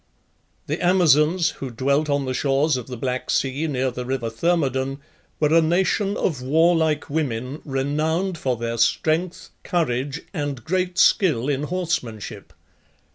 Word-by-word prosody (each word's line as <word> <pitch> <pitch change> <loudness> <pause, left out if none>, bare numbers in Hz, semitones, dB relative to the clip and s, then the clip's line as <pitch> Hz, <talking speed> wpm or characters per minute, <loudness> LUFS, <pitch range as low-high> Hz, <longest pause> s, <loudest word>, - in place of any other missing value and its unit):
The - - -3
Amazons, 170 -1 +4
who 135 - -3
dwelt 140 +5 0
on 140 -1 +1
the 130 - -2
shores 140 +3 +1
of 125 -2 -5
the 125 -2 -6
Black 130 +1 -3
Sea, 135 +4 0
near 130 -3 -1
the 125 +1 -5
river 125 -3 -3
Thermodon, 135 -1 0 0.4
were 150 0 +2
a 165 - +6
nation 190 +5 +1
of 145 -8 -1
warlike 160 +2 +2
women, 140 -2 -3
renowned 155 +6 -1
for 130 -4 -1
their 115 0 -3
strength, 165 +9 0
courage, 140 -3 -1
and 145 - -3
great 180 +1 -1
skill 145 - +3
in 140 -2 0
horsemanship. 155 - -4
145 Hz, 140 wpm, -23 LUFS, 130-165 Hz, 0.4 s, a